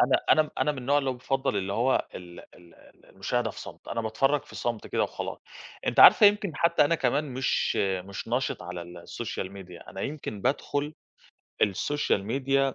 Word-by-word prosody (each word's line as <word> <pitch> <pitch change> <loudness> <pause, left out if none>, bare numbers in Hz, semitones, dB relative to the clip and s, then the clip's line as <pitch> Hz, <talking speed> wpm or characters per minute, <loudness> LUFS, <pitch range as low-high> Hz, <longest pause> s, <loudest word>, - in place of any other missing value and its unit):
أنا، - - +3 0.2
أنا، 155 - 0
أنا 150 - +2
من 135 - -8
النوع 140 +3 +2
اللي 135 -2 0
هو - - -3
بيفضَّل 135 -2 -1
اللي 100 0 -2
هو 120 +5 +1
ال 85 -1 -9
ال 85 -1 -19
ال - - -21
المشاهدة 115 +4 -2
في - - -10
صمت، - - -11
أنا 115 - -2
باتفرّج 135 +6 +1
في - - -15
صمت 120 -2 -3
كده - - 0
وخلاص، - - -4 0.5
أنتِ - - +3
عارفة 210 - +10
يمكن 205 -6 +1
حتى 170 -3 +4
أنا 155 - +2
كمان 140 0 +1
مش، 130 -1 0
مش 95 +2 -2
نَشِط 125 -5 -1
على 90 0 -6
السوشيال 90 +3 -6
ميديا 90 -3 -11
أنا 95 - -7
يمكن 135 -7 -5
بادخل 145 +3 -1 0.7
السوشيال 105 +1 +1
ميديا 135 +3 +1
125 Hz, 185 wpm, -27 LUFS, 95-140 Hz, 0.7 s, عارفة